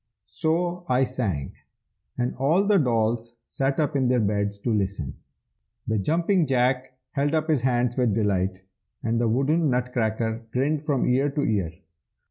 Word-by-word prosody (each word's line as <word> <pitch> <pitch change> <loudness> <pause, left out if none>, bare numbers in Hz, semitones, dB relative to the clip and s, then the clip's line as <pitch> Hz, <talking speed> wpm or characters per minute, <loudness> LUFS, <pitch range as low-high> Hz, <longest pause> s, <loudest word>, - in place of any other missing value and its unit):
So 170 - -1
I 125 +1 +3
sang, 110 - -2 0.6
and 125 0 -1
all 155 +9 +3
the 205 -1 +4
dolls 115 -3 0
sat 135 +2 -1
up 150 -1 0
in 130 -2 +2
their 125 0 +3
beds 100 -1 0
to 115 - 0
listen. 95 -9 -2 0.7
The 110 -1 0
Jumping 170 - +1
Jack 130 0 +1
held 145 +2 0
up 155 0 0
his 155 -6 +2
hands 125 -1 +1
with 120 -5 +2
delight, 95 -3 0 0.4
and 115 +1 0
the 120 - +2
wooden 145 +7 +2
Nutcracker 115 -2 -1
grinned 145 +4 0
from 140 -4 +1
ear 135 +3 +2
to 145 +1 -2
ear. 100 - 0
125 Hz, 155 wpm, -25 LUFS, 110-145 Hz, 0.7 s, the